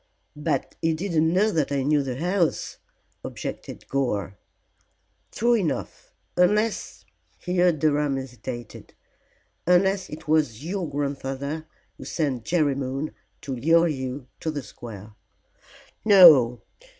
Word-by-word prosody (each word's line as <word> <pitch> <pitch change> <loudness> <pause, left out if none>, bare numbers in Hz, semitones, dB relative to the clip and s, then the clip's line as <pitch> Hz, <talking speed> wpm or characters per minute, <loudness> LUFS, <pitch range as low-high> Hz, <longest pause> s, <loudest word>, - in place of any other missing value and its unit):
"But 150 -2 -2
he 165 -1 +1
didn't 160 -2 +1
know 205 +5 +3
that 155 -6 0
I 140 -1 0
knew 145 +1 +2
the 130 -3 -4
house," 175 +4 -1 0.4
objected - - -7
Gore. 105 -8 -1 1.0
"True 240 +2 +2
enough, 185 -9 -3 0.2
unless" 210 +5 +1 0.3
here 180 -1 +2
Durham 150 -2 +1
hesitated 125 -2 -8 0.7
"unless 190 +2 +3
it 150 - -9
was 150 -5 +1
your 185 -1 -3
grandfather 140 +2 -4 0.3
who - - -9
sent 135 -8 -2
Jerry 155 -5 +2
Moon 135 +2 -3 0.3
to 135 -2 -4
lure 165 +7 +4
you 130 -3 -4
to 160 - -3
the 145 -3 -4
square." 110 -4 -10 0.9
"No! 160 - +7
150 Hz, 115 wpm, -25 LUFS, 135-175 Hz, 1.0 s, No